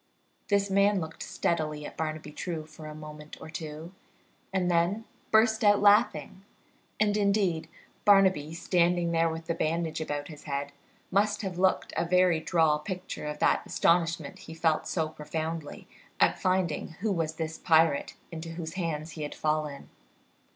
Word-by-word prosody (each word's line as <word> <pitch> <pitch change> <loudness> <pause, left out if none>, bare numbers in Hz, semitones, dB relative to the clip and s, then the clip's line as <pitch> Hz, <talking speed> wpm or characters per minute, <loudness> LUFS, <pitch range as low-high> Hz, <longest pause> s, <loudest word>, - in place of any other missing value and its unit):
This 200 -1 +2
man 200 +1 +4
looked 160 -1 -7
steadily 155 -3 -1
at - - -8
Barnaby 155 -1 -4
True 160 0 -4
for 155 0 -11
a 150 - -8
moment 150 0 -10
or 155 - -9
two, 160 +1 -7 0.6
and 185 -2 +1
then 175 +6 +1 0.2
burst 220 0 +4
out 205 -1 +6
laughing; 205 -4 +3 0.6
and, 210 -1 +3
indeed, 200 -5 +1 0.3
Barnaby, 190 -7 +4
standing 175 0 +2
there 165 0 +3
with 165 0 -5
the 170 - -1
bandage 160 0 -1
about 145 -2 -3
his 150 -3 -11
head, 140 -1 -3 0.4
must 205 +2 +2
have 185 -3 -4
looked 190 0 +2
a 165 - +1
very 180 -1 +3
droll 160 -2 +2
picture 180 -2 -5
of 150 0 -4
that - - +2
astonishment 170 0 +1
he 160 -4 -10
felt 160 -1 +1
so 160 -3 0
profoundly 155 0 -5 0.3
at - - +3
finding 185 -4 0
who 215 0 +1
was 165 -4 -1
this 160 0 -4
pirate 160 -3 +3 0.2
into 165 0 -6
whose 160 -2 -6
hands 165 -3 -3
he 155 - -8
had 150 - -4
fallen. 150 -2 -2
165 Hz, 160 wpm, -29 LUFS, 155-185 Hz, 0.6 s, out